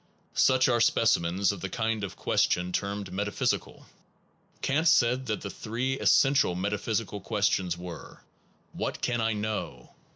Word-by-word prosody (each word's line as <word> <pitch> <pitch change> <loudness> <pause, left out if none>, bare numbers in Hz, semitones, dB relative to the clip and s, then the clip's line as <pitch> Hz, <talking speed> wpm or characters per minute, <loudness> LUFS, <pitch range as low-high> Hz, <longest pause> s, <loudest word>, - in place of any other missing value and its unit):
Such 130 0 +4
are 120 -2 +2
specimens 95 -5 +2
of 100 - -8
the 95 - -4
kind 110 -1 -1
of 95 -1 -5
question 90 +1 +1
termed 100 0 -3
metaphysical. 100 +2 -2 0.8
Kant 155 +5 +1
said 130 -3 +3
that 105 -2 -2
the 100 - -5
three 125 +4 -3
essential 135 -9 +4
metaphysical 105 +2 -2
questions 95 -4 0
were: 90 -2 -9 0.5
What - - -4
can 120 -1 0
I 110 0 +1
know? 105 -12 -4
105 Hz, 135 wpm, -28 LUFS, 95-120 Hz, 0.8 s, Such